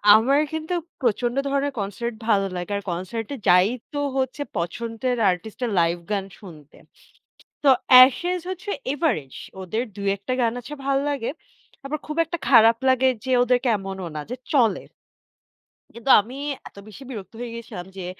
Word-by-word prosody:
আমার 270 Hz, +6 st, +4 dB
কিন্তু 315 Hz, +3 st, -3 dB, 0.3 s
প্রচন্ড 240 Hz, +1 st, 0 dB
ধরনের 280 Hz, 0 st, 0 dB
কনসার্ট 220 Hz, +4 st, -4 dB
ভালো 200 Hz, -3 st, +3 dB
লাগে। 180 Hz, +3 st, -5 dB
আর 200 Hz, -, -6 dB
কনসার্ট 185 Hz, +6 st, -4 dB
এ -, -, -8 dB
যাই 180 Hz, +2 st, +6 dB, 0.3 s
তো 290 Hz, -, -2 dB, 0.2 s
হচ্ছে, 260 Hz, +2 st, -1 dB, 0.2 s
পছন্দের 230 Hz, +8 st, -2 dB
আর্টিস্ট 180 Hz, +7 st, -7 dB
এর 225 Hz, -, -2 dB
লাইভ 170 Hz, +1 st, +2 dB
গান 200 Hz, -2 st, 0 dB
শুনতে। 155 Hz, -8 st, -14 dB, 0.9 s
তো 280 Hz, -, +5 dB, 0.4 s
Ashes 350 Hz, +7 st, -1 dB
হচ্ছে 375 Hz, +3 st, -6 dB, 0.2 s
এভারেজ, 230 Hz, -, -1 dB, 0.3 s
ওদের 220 Hz, +6 st, -2 dB
২-১ 200 Hz, -1 st, -1 dB
টা -, -, +1 dB
গান 230 Hz, -, +2 dB
আছে 250 Hz, +5 st, -11 dB
ভাল 275 Hz, 0 st, +2 dB
লাগে। 270 Hz, -5 st, -2 dB, 0.6 s
আবার 300 Hz, +2 st, -3 dB
খুব 305 Hz, -, -5 dB
একটা 340 Hz, +2 st, -5 dB
খারাপ 230 Hz, -3 st, +7 dB
লাগে 260 Hz, 0 st, +4 dB, 0.2 s
যে 260 Hz, -, -1 dB
ওদের 250 Hz, 0 st, +3 dB
কে, 250 Hz, -, +2 dB
এমনও 190 Hz, -2 st, -6 dB
না 150 Hz, -, -2 dB
যে 250 Hz, -, -3 dB, 0.2 s
চলে। 235 Hz, -6 st, +3 dB, 1.1 s
কিন্তু 235 Hz, +3 st, -3 dB
আমি 245 Hz, +6 st, -9 dB, 0.3 s
এত -, -, -29 dB
বেশি 215 Hz, +6 st, -12 dB
বিরক্ত 210 Hz, -4 st, -8 dB
হয়ে 235 Hz, -1 st, -5 dB
গেছিলাম 210 Hz, -6 st, -8 dB
যে, 180 Hz, -2 st, -5 dB
230 Hz, 165 wpm, -23 LUFS, 195-265 Hz, 1.1 s, খারাপ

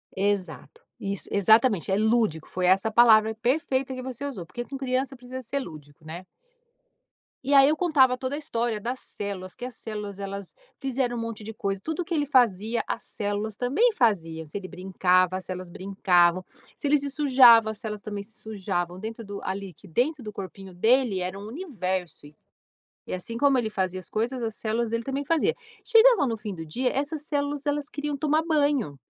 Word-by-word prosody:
Exato, 190 Hz, -4 st, -2 dB, 0.2 s
isso 200 Hz, 0 st, -4 dB
exatamente 210 Hz, -1 st, +4 dB
é 190 Hz, -, +3 dB
lúdico 220 Hz, -7 st, +1 dB
foi 185 Hz, 0 st, -1 dB
essa 195 Hz, +4 st, +3 dB
palavra 220 Hz, -1 st, +6 dB
perfeita 260 Hz, 0 st, 0 dB
que 255 Hz, -, -6 dB
você 260 Hz, +1 st, -5 dB
usou, 200 Hz, -12 st, -5 dB
porque 240 Hz, +8 st, -6 dB
com 275 Hz, -, -8 dB
criança 265 Hz, +1 st, -1 dB
precisa 255 Hz, +1 st, -8 dB
ser 280 Hz, +4 st, -2 dB
lúdico, 155 Hz, -, -10 dB
né. 170 Hz, +4 st, -8 dB, 1.2 s
E 280 Hz, +2 st, +2 dB
aí 275 Hz, +1 st, +8 dB
eu 310 Hz, -, +2 dB
contava 285 Hz, -7 st, +4 dB
toda 260 Hz, +2 st, -3 dB
a -, -, -4 dB
história 235 Hz, -6 st, -2 dB
das 245 Hz, +4 st, -4 dB
células, 195 Hz, -2 st, -6 dB
que 245 Hz, -, -7 dB
as 250 Hz, -2 st, -7 dB
células 210 Hz, -3 st, -6 dB
elas 195 Hz, -1 st, -6 dB, 0.2 s
fizeram 260 Hz, -3 st, -1 dB
um -, -, -3 dB
monte 230 Hz, -2 st, -5 dB
de 220 Hz, -, -6 dB
coisa, 195 Hz, -2 st, -2 dB
tudo 320 Hz, +2 st, -3 dB
que 340 Hz, -, -4 dB
ele 295 Hz, -2 st, +1 dB
fazia 235 Hz, -4 st, +2 dB
as -, -, -3 dB
células 205 Hz, 0 st, -3 dB
também 290 Hz, -, +2 dB
faziam, 165 Hz, -, +1 dB
se 155 Hz, -, -6 dB
ele 185 Hz, -, -8 dB
brincava, 185 Hz, 0 st, +1 dB
as 185 Hz, -, -7 dB
células 185 Hz, -1 st, -6 dB
brincavam, 185 Hz, -1 st, +2 dB, 0.3 s
se 290 Hz, -, -2 dB
ele 295 Hz, +1 st, +4 dB
se 280 Hz, 0 st, -3 dB
sujava 255 Hz, -6 st, +6 dB
as 215 Hz, -, -9 dB
células 210 Hz, -2 st, -5 dB
também 205 Hz, -2 st, -5 dB
se 220 Hz, +3 st, -16 dB
sujavam, 185 Hz, -4 st, -3 dB
dentro 225 Hz, +2 st, -6 dB
do 200 Hz, 0 st, -7 dB
ali 190 Hz, -1 st, -4 dB
que 200 Hz, -, -17 dB
dentro 255 Hz, -, 0 dB
do 210 Hz, -, -6 dB
corpinho 195 Hz, -1 st, -8 dB
dele 225 Hz, +1 st, +3 dB
era 185 Hz, +2 st, -4 dB
um 205 Hz, -, -8 dB
universo 190 Hz, -, -4 dB
e, 150 Hz, -, -18 dB, 0.7 s
e -, -, -5 dB
assim 205 Hz, +6 st, -4 dB
como 275 Hz, +1 st, +3 dB
ele 225 Hz, -3 st, 0 dB
fazia 185 Hz, -2 st, -2 dB
as 185 Hz, -, -9 dB
coisas 240 Hz, +4 st, -2 dB
as 225 Hz, -2 st, -3 dB
células 225 Hz, +1 st, -1 dB
dele 230 Hz, 0 st, -1 dB
também 275 Hz, +3 st, -3 dB
fazia. 330 Hz, +10 st, +2 dB, 0.3 s
Chegava 455 Hz, -, +6 dB
no 225 Hz, -, -1 dB
fim 210 Hz, -2 st, -6 dB
do 165 Hz, -, -7 dB
dia 250 Hz, +12 st, -1 dB
essas 290 Hz, +2 st, -2 dB
células 290 Hz, -1 st, -2 dB
elas 290 Hz, 0 st, -1 dB
queriam 290 Hz, -1 st, -3 dB
tomar 305 Hz, +2 st, +1 dB
banho. 285 Hz, -, +1 dB
225 Hz, 195 wpm, -26 LUFS, 190-270 Hz, 1.2 s, aí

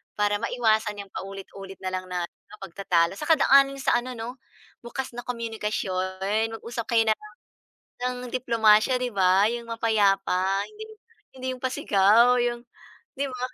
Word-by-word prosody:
Para 205 Hz, 0 st, +1 dB
maiwasan 220 Hz, -3 st, 0 dB
'yang 195 Hz, -, -20 dB
paulit-ulit 195 Hz, 0 st, -8 dB
na 185 Hz, -, -2 dB
lang 185 Hz, 0 st, -4 dB
na 180 Hz, -1 st, -2 dB
ano, 170 Hz, -, -12 dB
pagtatalo. 180 Hz, -1 st, 0 dB
Saka 320 Hz, +2 st, +3 dB
daanin 275 Hz, -1 st, +5 dB
sa -, -, +3 dB
ano 250 Hz, 0 st, -7 dB
'no, 240 Hz, +3 st, -7 dB, 0.4 s
bukas 245 Hz, +2 st, -5 dB
na 245 Hz, -, -5 dB
komunikasyon, 210 Hz, -2 st, -2 dB
mag-usap 230 Hz, 0 st, -6 dB
kayo 225 Hz, -, +6 dB
na 215 Hz, -, +4 dB, 0.9 s
lang 250 Hz, 0 st, -2 dB
ng 245 Hz, -, -9 dB
diplomasiya, 230 Hz, -1 st, +4 dB
'di 250 Hz, -1 st, -2 dB
ba. 190 Hz, +1 st, +4 dB
'Yong 235 Hz, -1 st, -5 dB
mapayapa, 195 Hz, -4 st, +1 dB
hindi 430 Hz, 0 st, -10 dB, 0.5 s
hindi 260 Hz, 0 st, -6 dB
'yong 255 Hz, -, -11 dB
pasigaw, 235 Hz, 0 st, +4 dB
'yong 240 Hz, 0 st, -2 dB, 0.5 s
'di 280 Hz, -, 0 dB
ba? 255 Hz, -1 st, -8 dB
220 Hz, 150 wpm, -25 LUFS, 195-245 Hz, 0.9 s, kayo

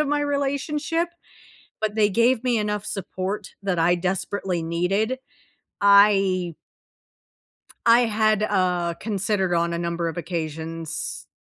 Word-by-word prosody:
of 300 Hz, -, +1 dB
my 295 Hz, 0 st, +1 dB
relationship, 290 Hz, +4 st, -1 dB, 0.7 s
but 215 Hz, -1 st, -1 dB
they 210 Hz, -2 st, +3 dB
gave 235 Hz, +4 st, +2 dB
me 240 Hz, -3 st, +2 dB
enough 210 Hz, -1 st, -2 dB
support 190 Hz, +1 st, -4 dB
that 190 Hz, -3 st, -1 dB
I 170 Hz, +2 st, +4 dB
desperately 185 Hz, 0 st, -2 dB
needed. 195 Hz, +9 st, 0 dB, 0.6 s
I 195 Hz, -4 st, +5 dB, 1.3 s
I 235 Hz, +1 st, +7 dB
had, 215 Hz, -2 st, +2 dB
uh 180 Hz, -4 st, +1 dB
considered 200 Hz, -3 st, -1 dB
on 170 Hz, 0 st, +1 dB
a -, -, -1 dB
number 170 Hz, 0 st, -2 dB
of 165 Hz, -, -5 dB
occasions 165 Hz, -1 st, -4 dB
195 Hz, 120 wpm, -24 LUFS, 175-220 Hz, 1.3 s, I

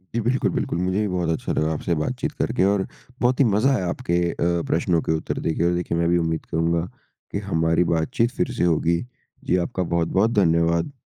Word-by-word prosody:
जी -, -, +2 dB
बिल्कुल, 125 Hz, +4 st, +1 dB
बिल्कुल। -, -, -2 dB
मुझे 95 Hz, +2 st, 0 dB
भी 105 Hz, -, 0 dB
बहुत 90 Hz, -3 st, -1 dB
अच्छा 80 Hz, -, -1 dB
लगा 80 Hz, +1 st, 0 dB
आपसे 85 Hz, -, -2 dB
बातचीत 75 Hz, 0 st, -2 dB
करके, -, -, +1 dB
और 100 Hz, 0 st, +2 dB, 0.4 s
बहुत 125 Hz, +1 st, +2 dB
ही 140 Hz, -, +6 dB
मज़ा 115 Hz, +6 st, +3 dB
आया 95 Hz, -7 st, -1 dB
आपके 85 Hz, 0 st, -1 dB
अ, -, -, -9 dB, 0.3 s
प्रश्नों 85 Hz, 0 st, +1 dB
के -, -, -2 dB
उत्तर 80 Hz, -, -2 dB
देके 80 Hz, +1 st, 0 dB
और 90 Hz, -, +2 dB
देखिए, 85 Hz, -1 st, -2 dB
मैं 85 Hz, -, +1 dB
भी 85 Hz, -, +3 dB
उम्मीद 80 Hz, -1 st, -1 dB
करुँगा 85 Hz, +1 st, +1 dB, 0.5 s
कि 100 Hz, -, -2 dB
हमारी 80 Hz, +1 st, +2 dB
बातचीत 85 Hz, +8 st, 0 dB
फिर 130 Hz, -, -2 dB
से -, -, +1 dB
होगी। 85 Hz, 0 st, +2 dB, 0.4 s
जी 90 Hz, -, +1 dB
आपका 95 Hz, -, -3 dB
बहुत-बहुत 95 Hz, +6 st, +2 dB
धन्यवाद। 85 Hz, -, +2 dB
85 Hz, 205 wpm, -23 LUFS, 80-100 Hz, 0.5 s, ही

